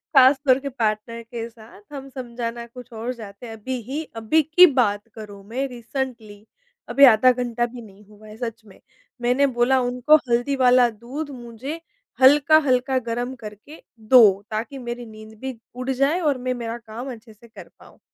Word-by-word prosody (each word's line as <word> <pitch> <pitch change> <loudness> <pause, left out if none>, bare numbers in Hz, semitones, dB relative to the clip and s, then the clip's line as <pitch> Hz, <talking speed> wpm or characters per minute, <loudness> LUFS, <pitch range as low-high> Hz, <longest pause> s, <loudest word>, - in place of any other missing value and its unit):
ख़ासतौर 265 0 +5
के 280 0 -5
पार्टनर 230 -1 -2
के 230 0 -6
साथ, 220 -2 -16
हम 275 -1 -8
समझाना 235 -2 -6
कुछ 245 +1 -13
और 230 +3 -4
जाते 215 -1 -11
हैं, 225 - -8
अभी 245 +4 -5
ही 300 +4 -3
अभी 225 +8 +2
की 320 +5 +7
बात 230 - +1
करूँ 205 -3 -10
मैं 265 +4 -2
रिसेंटली, 235 -4 -6 0.4
अभी 280 0 +7
आधा 250 +1 +6
घंटा 240 -1 -1
भी 240 0 -9
नहीं 205 -2 -16
हुआ 210 0 -16
है 215 0 -12
सच 230 -1 -5
में। 195 -3 -18 0.4
मैंने 250 +3 +2
बोला 255 +1 +2
उनको, 250 +4 +3
"हल्दी 240 +4 +1
वाला 250 -2 +4
दूध 245 +7 -7
मुझे 245 +7 -7 0.4
हल्का-हल्का 275 -2 +4
गरम 240 +2 -3
करके 220 +5 -12 0.2
दो, 215 -4 +5
ताकि 225 +6 -4
मेरी 240 -1 -6
नींद 215 0 -13
भी 265 -1 -6 0.2
उड़ 255 +1 -5
जाए 275 +6 +1
और 295 -6 +1
मैं, 255 0 -2
मेरा 235 -1 -5
काम 235 +3 -8
अच्छे 225 -1 -12
से 230 +3 -19
कर 225 - -13
पाऊँ।" - - -18
240 Hz, 175 wpm, -22 LUFS, 225-265 Hz, 0.4 s, की